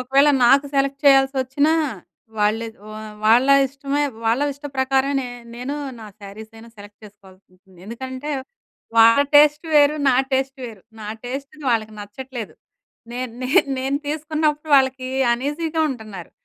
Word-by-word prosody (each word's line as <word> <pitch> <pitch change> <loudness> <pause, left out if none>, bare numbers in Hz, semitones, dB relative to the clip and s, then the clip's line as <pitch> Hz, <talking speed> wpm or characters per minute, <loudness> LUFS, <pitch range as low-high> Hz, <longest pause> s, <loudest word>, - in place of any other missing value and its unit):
ఒకవేళ 270 +3 +3 0.2
నాకు 275 +3 +4
సెలెక్ట్ 275 0 0
చేయాల్సొ‌చ్చినా, 270 +2 +3 0.7
వాళ్ళే 215 +2 +1 0.2
వా 215 - -8 0.3
వాళ్ళ 235 +4 +5 0.2
ఇష్టమే 280 +2 -3 0.2
వాళ్ళ 230 +5 +1
ఇష్ట 285 +1 -10
ప్రకారమే 265 +1 +1
నే - - -5 0.3
నేనూ 250 +4 -5 0.3
నా 220 - -9
శారీస‌యినా 220 +3 -12
సెలెక్ట్ 205 +1 -15
చేసుకోవాల్సుంటుంది. 190 -2 -20
ఎందుకంటే, 260 +5 -7 0.7
వాళ్ళ 230 +5 +7
టేస్ట్ 295 +2 +4
వేరు. 290 0 +5
నా 260 - +4 0.2
టేస్ట్ 270 +1 -1
వేరు. 220 -6 -10 0.2
నా 210 - -7 0.2
టేస్ట్‌ది 275 +4 -7
వాళ్ళకి 220 -2 -1
నచ్చట్లేదు. 235 +2 -8 0.6
నేన్ 250 -1 -5
నేన్ 255 +3 +3
నేను 270 +2 -1
తీసుకున్నప్పుడు 305 0 -2
వాళ్ళకి 260 -1 +1 0.2
అన్‌ఈజీగా 305 +6 -2
ఉంటన్నారు. 215 -8 -9
260 Hz, 130 wpm, -21 LUFS, 225-280 Hz, 0.7 s, వాళ్ళ